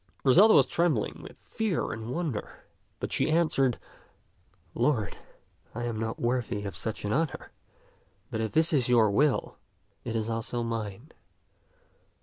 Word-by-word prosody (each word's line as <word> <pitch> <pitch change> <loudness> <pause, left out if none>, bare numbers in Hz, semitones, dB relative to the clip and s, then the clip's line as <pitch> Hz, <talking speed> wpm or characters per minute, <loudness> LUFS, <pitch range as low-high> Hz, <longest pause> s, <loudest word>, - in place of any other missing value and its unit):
Griselda 195 - +7
was 135 - +7
trembling 155 -6 0
with - - -12
fear 215 -7 -2
and 110 +1 -6
wonder, 145 -6 -4 0.4
but - - -4
she - - +1
answered, 150 -6 +2 0.5
" 95 0 -38
Lord, 120 -3 0 0.6
I 120 - -3
am 115 -2 -3
not 110 0 -3
worthy 120 -4 -1
of 100 -4 -5
such 110 +2 -4
an 105 - 0
honor; 160 0 -2 0.8
but 110 - -2
if 110 - -2
this 160 +1 +4
is 130 -4 +2
your 115 -4 +5
will, 140 +6 +1 0.4
it 115 -1 -4
is 110 -1 -1
also 115 +1 -2
mine. 115 +3 -5
120 Hz, 145 wpm, -28 LUFS, 110-150 Hz, 0.8 s, Griselda